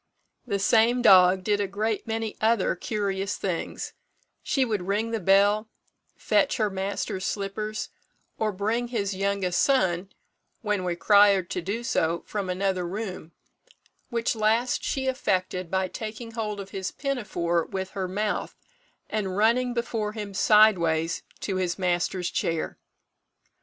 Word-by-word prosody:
The 200 - 0
same 230 +4 +3
dog 185 -3 +7
did 205 0 +1
a 200 - 0
great 215 +3 -2
many 225 -1 -2
other 220 -2 +2
curious 200 0 -2
things: 180 -4 -4 0.5
she 265 -2 +1
would 210 -6 -2
ring 215 +3 0
the 225 - -1
bell, 205 +3 +3 0.5
fetch - - +1
her 215 -3 +1
master's 190 0 -3
slippers, 210 +2 -3 0.5
or 215 -1 +1
bring 220 +5 -1
his 205 -5 -2
youngest 195 -2 0
son, 190 -9 +2 0.5
when 210 -3 0
required 190 +1 +4
to 180 - -2
do 205 +7 -3
so, 170 -9 0
from 200 -3 -3
another 185 -1 -1
room; 185 -4 -6 0.8
which 235 -1 0
last 225 +3 +1
she 265 -1 -1
effected 185 -8 -1
by 190 +1 0
taking 220 +4 -7
hold 215 -2 -3
of 195 -1 -8
his 190 -1 -3
pinafore 185 - -1
with 190 -1 -5
her 190 -2 -3
mouth, 205 +3 -2 0.5
and 195 -3 -2
running 240 +4 +3
before 225 -3 -2
him 210 -2 -6
sideways 175 -7 +4 0.2
to 190 -2 -2
his 180 -1 -1
master's 180 -1 0
chair. 165 -1 -2
200 Hz, 135 wpm, -26 LUFS, 185-220 Hz, 0.8 s, dog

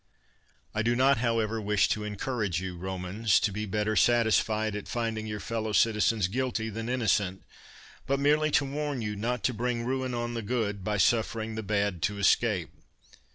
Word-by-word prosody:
I 110 - 0
do 120 +2 +1
not, 135 0 +4
however, 115 -2 0
wish 105 0 +2
to 105 - -1
encourage 105 -3 -2
you, 95 -1 -5
Romans, 95 +4 0
to 105 - 0
be 105 +2 -4
better 105 +2 -1
satisfied 110 -2 +2
at 105 - -6
finding 115 -2 -2
your 105 -1 -4
fellow 110 +1 -3
citizens 105 -2 +3
guilty 115 0 -2
than 115 +2 -5
innocent, 105 -6 0 0.6
but 135 +1 +1
merely 150 +2 +3
to 150 -1 +2
warn 145 -2 -3
you 105 -1 -3
not 115 +2 -2
to 130 - +1
bring 120 +1 -2
ruin 130 0 -2
on 120 0 -3
the 115 - -3
good, 105 -3 -2
by 105 +1 -1
suffering 110 +1 +1
the 110 - -3
bad 100 -4 -1
to 100 +4 -1
escape. 100 - +2
110 Hz, 175 wpm, -28 LUFS, 105-120 Hz, 0.6 s, not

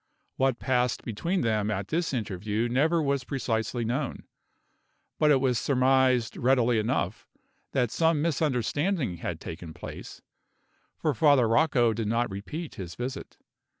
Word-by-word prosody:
What 135 -2 +2
passed 125 -1 0
between 165 - -2
them 110 -2 0
at 100 -2 -3
this 165 +2 0
interview 110 -1 -2
never 155 +7 +2
was 140 -2 0
precisely 120 -2 -2
known; 130 +4 -2 1.0
but 155 - +4
it 140 -3 +5
was 130 -3 +1
surmised 130 -3 +2
readily 125 -2 +3
enough 110 -3 -2 0.5
that 125 -4 +1
some 165 -2 +2
misunderstanding 145 - 0
had 85 -1 -4
taken 80 -1 -8
place, - - -9 0.7
for 155 - 0
Father 135 -1 +4
Rocco 120 -1 +3
did 110 -1 -3
not 115 0 0
repeat 150 - -6
his 85 -2 -7
visit. 125 +2 -6
125 Hz, 135 wpm, -27 LUFS, 110-140 Hz, 1.0 s, it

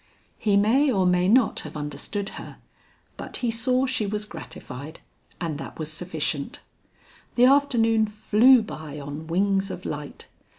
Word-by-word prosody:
He 205 -2 +2
may 260 +8 +4
or 190 -5 +2
may 180 0 +3
not 230 +2 +4
have - - -7
understood 150 +8 -4
her, - - -9 0.6
but - - -5
he 235 - +1
saw 250 +3 +1
she 255 -5 -1
was 210 +1 -2
gratified, 150 -6 -9 0.4
and 160 -4 -3
that - - -8
was 155 -1 -4
sufficient. 155 -4 -3 0.7
The 245 - +6
afternoon 235 -5 +4
flew 220 +4 +5
by 155 -7 -8
on 145 +3 -7
wings 195 +3 +1
of 185 - -7
light. 145 -1 -6
200 Hz, 145 wpm, -25 LUFS, 155-225 Hz, 0.7 s, The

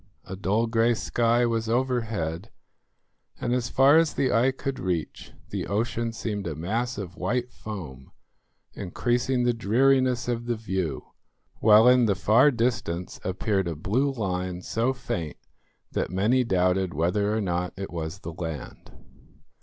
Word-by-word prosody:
A 95 - -6
dull 105 +4 +1
grey 115 +1 +2
sky 120 +2 +1
was 115 -1 -1
overhead, 115 -8 -1 0.9
and 125 0 0
far 135 +5 +5
as 165 -2 +1
the 130 - +1
eye 120 +3 +4
could 135 0 -4
reach 90 -4 -3 0.2
the - - -3
ocean 115 +2 -1
seemed 105 -4 -4
a 80 - -4
mass 115 - -2
of 90 -4 -7
white 120 +7 -1
foam 75 -12 -8 0.6
increasing 120 +6 -1
the 120 0 +2
dreariness 125 +3 +2
of 120 -1 -2
the 120 - 0
view, 95 - -3 0.5
while 110 +2 +7
in 125 -2 +6
the 100 - +2
far 110 +10 +5
distance 115 -9 -2
appeared 95 0 -1
a 85 - -3
blue 115 - 0
line 90 -6 -3
so 115 +3 0
faint 90 - -4 0.5
that - - -1
many 105 +8 +2
doubted 90 - +1
whether 100 +6 +1
or 110 - 0
not 90 -3 -1
it 95 0 -5
was 85 +2 -5
the 85 -2 -6
land. 80 -4 -7
110 Hz, 145 wpm, -26 LUFS, 90-120 Hz, 0.9 s, while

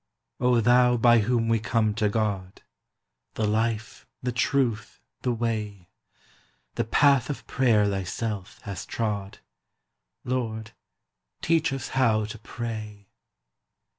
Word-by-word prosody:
O 125 -1 +3
Thou 125 +1 +5
by 120 0 +5
whom 115 +1 +1
we 115 -1 +2
come 110 -1 +1
to 105 -1 +1
God 100 -3 -2 0.7
The 110 - 0
life, 110 0 -1 0.2
the 125 - 0
truth, 125 -3 0 0.2
the 125 - 0
way! 105 -5 -3 0.8
The - - -1
path 135 +1 +3
of 145 - -5
prayer 110 -6 +3
Thyself 100 +1 -3
hast 100 -2 -6
trod; 105 -4 -3 0.9
Lord, 110 -4 -3 0.7
teach 160 -2 +2
us 135 -1 -4
how 115 -5 +2
to 110 +1 -8
pray! 110 -3 -7
115 Hz, 115 wpm, -26 LUFS, 105-125 Hz, 0.9 s, Thou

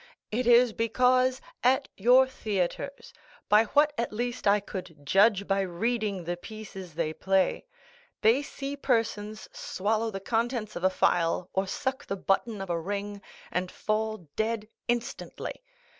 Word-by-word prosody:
It 240 +3 0
is 240 -1 +6
because, 255 +3 +2 0.2
at 265 +3 +3
your 250 +6 +6
theatres, 215 +3 -3 0.4
by 210 +2 +6
what 295 +6 +3
at 235 - -1
least 240 +1 -2
I 205 +1 +5
could 185 -7 -8
judge 200 +5 +4
by 195 0 +2
reading 200 +1 -1
the 175 +1 -2
pieces 190 -3 -9
they 160 -2 -1
play, 190 - +1 0.5
they 230 +6 +5
see 280 0 -5
persons 220 -5 -1
swallow 220 +3 -1
the 195 -3 -5
contents 225 +1 -1
of 175 - -5
a 185 - +5
phial, 175 -1 +1
or 190 0 0
suck 260 +7 -3
the 195 - -2
button 195 +2 0
of 195 -2 -4
a 170 - 0
ring, 200 +2 -4 0.3
and 180 0 -1
fall 215 -4 -2
dead 220 -1 -1 0.2
instantly. 240 - -3
215 Hz, 145 wpm, -28 LUFS, 195-240 Hz, 0.5 s, is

